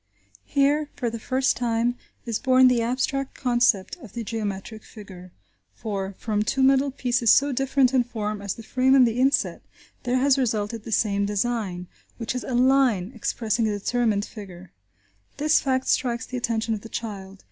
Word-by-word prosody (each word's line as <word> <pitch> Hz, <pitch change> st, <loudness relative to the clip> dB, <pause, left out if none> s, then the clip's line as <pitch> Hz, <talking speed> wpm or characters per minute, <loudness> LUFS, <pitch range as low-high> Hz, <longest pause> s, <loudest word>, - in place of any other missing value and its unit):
Here, 290 Hz, +1 st, +1 dB
for 240 Hz, -4 st, -2 dB
the 230 Hz, -, -6 dB
first 260 Hz, +3 st, 0 dB
time 235 Hz, 0 st, 0 dB, 0.3 s
is 230 Hz, -3 st, -2 dB
born 260 Hz, -1 st, +5 dB
the 245 Hz, -2 st, +2 dB
abstract 260 Hz, +3 st, -2 dB
concept 240 Hz, -, +1 dB
of 235 Hz, -, -13 dB
the 235 Hz, -, -4 dB
geometric 215 Hz, 0 st, -5 dB
figure, 185 Hz, -4 st, -12 dB, 0.4 s
for, 195 Hz, -3 st, -4 dB
from 210 Hz, -2 st, -1 dB
two 265 Hz, +5 st, 0 dB
metal 270 Hz, +1 st, +4 dB
pieces 245 Hz, -3 st, 0 dB
so 285 Hz, +1 st, +4 dB
different 270 Hz, 0 st, +2 dB
in 255 Hz, -2 st, +4 dB
form 215 Hz, -3 st, -4 dB
as 200 Hz, -1 st, -3 dB
the 230 Hz, -, -10 dB
frame 260 Hz, +3 st, +2 dB
and 260 Hz, -2 st, +7 dB
the 230 Hz, +1 st, -1 dB
inset, 270 Hz, +2 st, +1 dB, 0.4 s
there 250 Hz, 0 st, 0 dB
has 275 Hz, +1 st, +3 dB
resulted 220 Hz, -3 st, -2 dB
the -, -, -7 dB
same 200 Hz, -1 st, +1 dB
design, 205 Hz, -4 st, -2 dB, 0.3 s
which 230 Hz, 0 st, -3 dB
is 250 Hz, -, -4 dB
a 255 Hz, -, -3 dB
line 250 Hz, -6 st, +3 dB
expressing 225 Hz, -1 st, -1 dB
a 205 Hz, -1 st, -1 dB
determined 215 Hz, -1 st, 0 dB
figure. 185 Hz, -4 st, -11 dB, 0.7 s
This 300 Hz, +2 st, +3 dB
fact 260 Hz, -1 st, -1 dB
strikes 245 Hz, -1 st, 0 dB
the 255 Hz, -, -8 dB
attention 230 Hz, -2 st, -1 dB
of 210 Hz, -, -4 dB
the 225 Hz, -, -11 dB
child. 195 Hz, -4 st, -6 dB
235 Hz, 175 wpm, -24 LUFS, 210-260 Hz, 0.7 s, and